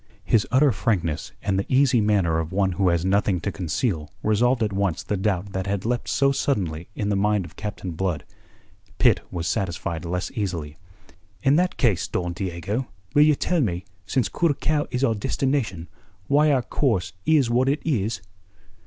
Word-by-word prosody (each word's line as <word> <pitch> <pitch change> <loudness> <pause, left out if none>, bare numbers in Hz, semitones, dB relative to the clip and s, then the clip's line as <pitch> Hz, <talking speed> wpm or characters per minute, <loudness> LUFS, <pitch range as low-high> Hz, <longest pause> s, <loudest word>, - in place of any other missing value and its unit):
His 110 - +2
utter 135 +3 +4
frankness, 85 -5 -1
and 95 -1 +1
the 100 - -1
easy 130 -2 +4
manner 95 -6 +2
of 80 0 -3
one 95 0 +1
who 95 +1 +2
has 85 0 +1
nothing 100 -1 +2
to 100 - -2
conceal 85 - -2
resolved 120 +3 +2
at 105 -2 -1
once 95 -5 0
the 105 - -2
doubt 100 -1 -1
that 95 0 -2
had 100 0 -2
leapt 120 +1 -1
so 140 0 +3
suddenly 90 - -1
in 105 - -2
the 100 - +1
mind 105 -1 +1
of 80 - -13
Captain 105 -3 -5
Blood. 85 -1 -2 0.7
Pitt - - +4
was 85 -2 -4
satisfied 85 -3 -2
less 90 +2 -3
easily. 90 - -3 0.7
"In 140 +1 +4
that 180 +1 +1
case, 105 -10 +2
Don 90 -1 -2
Diego, 95 +7 -3 0.3
will 145 - +5
you 150 0 +6
tell 175 +3 0
me, 90 -6 -1 0.2
since 130 -6 +1
Curacao 150 -2 0
is 125 +2 -2
our 115 - +3
destination, 110 - -1 0.4
why 150 +4 +4
our 130 -3 +2
course 110 -10 0
is 145 -7 +4
what 125 +3 +3
it 145 +2 +1
is?" 110 - 0
100 Hz, 180 wpm, -24 LUFS, 90-130 Hz, 0.7 s, you